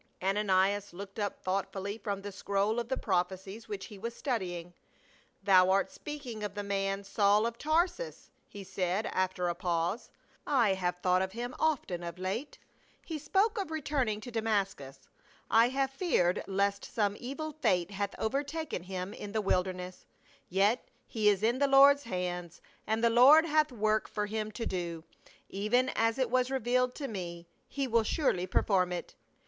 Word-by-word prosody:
Ananias 195 0 +1
looked 195 +3 -8
up 205 -1 -3
thoughtfully 195 +2 -2
from 200 -1 -4
the 205 - -5
scroll 200 +3 0
of 235 0 -4
the 265 - 0
prophecies 190 +3 -2
which 205 -2 -4
he 205 - -11
was 230 +3 -5
studying. 180 - -3 0.4
" - - -33
Thou 185 -2 +6
art 195 +1 +2
speaking 280 -7 -7
of 205 -1 -4
the 205 - -3
man, 195 0 -1
Saul 205 +2 +3
of 235 0 -3
Tarsus," 345 +10 -1 0.2
he 200 - -9
said, 190 +2 -1
after 185 -1 -1
a 175 - 0
pause. 175 +3 -1 0.2
" - - -31 0.2
I 195 - +3
have 180 -2 -1
thought 185 0 +3
of 190 0 -2
him 240 +2 -4
often 275 - 0
of 170 0 -6
late. 195 +10 -4 0.5
He 320 -3 -4
spoke 415 +8 +1
of 375 - -5
returning 275 -8 -1
to 245 - -8
Damascus; 195 - -2 0.4
I 230 +2 +6
have 270 0 0
feared 270 - +1
lest 200 +1 0
some 205 -4 -1
evil 295 +5 -5
fate 200 - +1
hath 200 0 -3
overtaken 285 - -2
him 185 +1 -5
in 205 0 -8
the 220 - +1
wilderness, 185 -2 -2 0.4
yet 200 +6 +2 0.2
he 215 -2 +2
is 205 0 +1
in 235 +3 +2
the 280 - +4
Lord's 280 0 +6
hands, 180 -4 -4 0.3
and 220 +2 0
the 235 - +5
Lord 275 +7 +8
hath 305 -2 +2
work 215 -2 0
for 210 -1 -2
him 215 0 -3
to 230 +2 -4
do 170 -3 -3 0.3
— - - -25
even 230 +6 +1
as 225 0 +1
it 255 -3 0
was 255 0 +2
revealed 250 -1 +1
to 280 - -4
me. 175 -5 -6 0.2
He 275 -1 -2
will 230 -1 +3
surely 200 - 0
perform 185 -1 +2
it." 175 - -5
205 Hz, 175 wpm, -31 LUFS, 185-245 Hz, 0.5 s, Lord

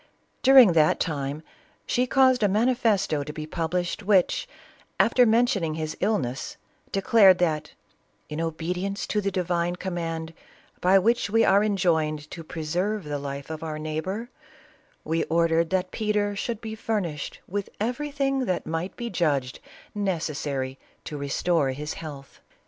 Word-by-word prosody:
During 260 -8 +8
that 155 -2 +4
time, 145 -1 -2 0.4
she 250 +1 +1
caused 260 -1 +4
a 205 - +4
manifesto 210 - +1
to 150 - -6
be 155 0 -6
published, 170 +4 -2
which, 195 -3 +2 0.5
after 250 -2 +5
mentioning 220 -8 +2
his 155 -1 -4
illness, 180 - -1 0.3
declared 195 -1 +5
that 155 -4 -1 0.5
"in 150 +2 -4
obedience 180 +5 -3
to 210 - -1
the 200 - 0
divine 175 -2 -1
command, 165 -3 -4 0.5
by 185 +2 +5
which 220 +2 +2
we 225 +2 +4
are 195 +1 +5
en 210 -1 +1
• 160 -4 +2
l 155 - -4
to 165 - -7
preserve 175 +7 -2
the 145 -1 -4
life 140 +1 -6
of 155 - -6
our 155 -2 -4
neighbor, 160 +10 -4 0.7
we 165 +2 0
ordered 165 0 +2
that 185 -1 -1
Peter 210 -1 0
should 230 +2 -3
be 220 -1 -5
furnished 200 -9 -3
with 200 +1 -3
everything 275 +3 -1
that 185 -5 -1
might 165 +4 -3
be 235 -1 -5
judged 140 -7 0 0.3
necessary 150 -9 -2 0.2
to 150 - -6
restore 145 +1 0
his 150 +3 -5
health." 145 -4 -10
175 Hz, 145 wpm, -25 LUFS, 155-210 Hz, 0.7 s, During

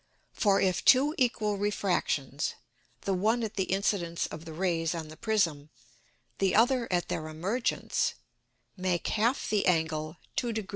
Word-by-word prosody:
For, 200 -2 +3
if 180 -7 +1
two 275 +4 +6
equal 215 -5 +1
Refractions, 175 -9 -1 0.5
the 195 - -1
one 220 +6 +1
at 220 -1 -3
the 190 -3 0
Incidence 185 -3 0
of 160 +2 -8
the 165 - -7
Rays 165 -1 0
on 160 -2 -5
the 155 - -10
Prism, 165 -7 0 0.7
the 195 -1 +2
other 240 0 +3
at 175 -1 +1
their 155 - -3
Emergence, 185 +11 -1 0.6
make 185 -2 -1
half 230 +5 +1
the 210 -2 +1
Angle 160 -2 0 0.2
2 240 -2 0
deg. 215 -3 -4
190 Hz, 150 wpm, -29 LUFS, 165-215 Hz, 0.7 s, two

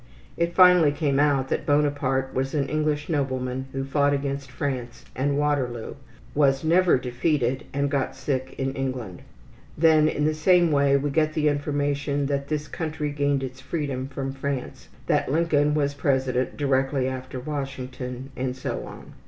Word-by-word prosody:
It 170 0 -1
finally 180 -5 +7
came 145 -2 0
out 140 -2 +2
that - - -2
Bonaparte 140 -2 +1
was 135 +3 -1
an 140 -2 +1
English 150 -1 -1
nobleman 130 -3 -2
who 135 0 -3
fought 140 +1 +2
against 140 -1 -3
France 125 -2 -4
and 140 +2 0
Waterloo, 135 -6 -1 0.4
was 135 -1 +3
never 175 +1 +4
defeated, 130 +1 -1
and 140 +1 0
got 140 -2 -1
sick 130 0 -3
in 135 0 -1
England. 130 -9 -4 0.6
Then 155 -1 +5
in 150 - -1
the 155 - +2
same 170 +1 +4
way 140 -1 +4
we 145 +1 -1
get 155 +1 +1
the 155 -1 +1
information 145 0 -1
that 140 0 -2
this 150 0 -2
country 155 -1 -3
gained 145 -1 0
its 130 0 -6
freedom 135 -3 -3
from 135 0 -4
France, 135 -1 -5 0.2
that - - +1
Lincoln 150 -2 +2
was 145 -2 +1
president 130 -3 0
directly 135 -1 +1
after 130 0 -5
Washington, 130 -2 -5
and 130 -1 -2
so 130 - -4
on. - - -11
140 Hz, 160 wpm, -25 LUFS, 130-150 Hz, 0.6 s, finally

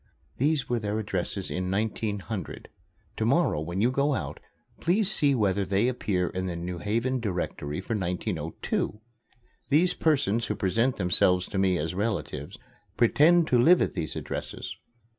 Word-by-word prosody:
These 145 0 +1
were 120 -1 0
their 105 -1 -2
addresses 100 -2 -3
in 90 0 -2
1900. 105 0 -3 0.5
To - - 0
morrow, 75 - +2
when 85 +5 -3
you 120 +3 +3
go 140 +1 +1
out, - - -4 0.4
please 195 +4 +2
see 145 -8 +3
whether 100 -4 +1
they 95 +5 +1
appear 95 -8 0
in 95 0 -3
the 90 - -3
New 85 +1 -5
Haven 115 +7 0
Directory 90 -7 -3
for 105 - -4
1902. 90 +2 -2 0.7
These 170 +5 +4
persons 135 -8 +1
who - - -1
present 115 +7 +1
themselves 90 0 +3
to 95 - -2
me 95 -2 +3
as 80 +1 -2
relatives 85 -8 -3 0.4
pretend 155 +8 +5
to 125 - +4
live 175 +7 +6
at - - 0
these 85 -4 -3
addresses. - - -5
105 Hz, 155 wpm, -27 LUFS, 90-130 Hz, 0.7 s, live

